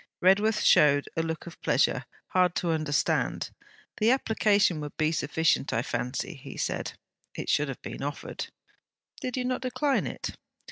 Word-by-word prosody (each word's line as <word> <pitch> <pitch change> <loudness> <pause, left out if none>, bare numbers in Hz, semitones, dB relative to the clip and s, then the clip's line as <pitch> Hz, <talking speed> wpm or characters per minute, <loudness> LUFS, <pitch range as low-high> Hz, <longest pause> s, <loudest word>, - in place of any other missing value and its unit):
Redworth 205 +4 +4
showed 145 -1 +5
a 165 - +1
look 160 -1 -4
of 170 - -11
pleasure, 125 0 +2 0.2
hard 180 -1 +3
to 170 - 0
understand. 155 -2 0 0.5
'The 220 +1 +3
application 210 - +3
would 150 -1 -7
be 155 0 +2
sufficient, 160 -2 +1
I 115 - 0
fancy,' 125 +8 -3
he - - -9
said. - - -2 0.4
'It - - -5
should 150 0 +2
have 135 - -7
been - - -6
offered.' 145 +1 -4 0.7
'Did 255 0 -3
you 250 - -1
not 255 0 -1
decline 270 +2 0
it?' - - -5
165 Hz, 155 wpm, -28 LUFS, 145-215 Hz, 0.7 s, showed